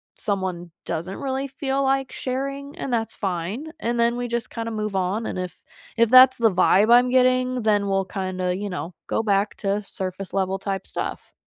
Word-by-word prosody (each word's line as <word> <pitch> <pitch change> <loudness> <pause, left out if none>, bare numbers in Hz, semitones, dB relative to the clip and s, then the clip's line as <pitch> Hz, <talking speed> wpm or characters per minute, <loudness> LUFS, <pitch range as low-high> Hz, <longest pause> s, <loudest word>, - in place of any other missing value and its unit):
someone 185 -4 -3
doesn't 175 +4 -4
really 270 0 -2
feel 270 0 -2
like 270 -1 +1
sharing 275 +2 -4
and 270 - -4
that's 225 -2 -1
fine, 195 - -3
and 235 -4 -1
then 235 +1 +2
we 245 0 -2
just 235 -1 -3
kinda 230 -1 -4
move 215 -2 -3
on, 190 +4 0
and - - -4
if 180 -2 -6 0.3
if 230 -1 +3
that's 255 +1 +8
the 225 -2 +4
vibe 190 +4 +4
I'm 245 +1 +6
getting, 255 0 +3
then 205 -2 +2
we'll 195 0 +1
kinda, 185 -1 -2
you 205 +2 -4
know, 180 -2 -5
go - - 0
back 205 -1 +1
to 200 0 -1
surface-level 190 0 -3
type 195 -1 -4
stuff. - - -5
215 Hz, 185 wpm, -23 LUFS, 190-255 Hz, 0.3 s, that's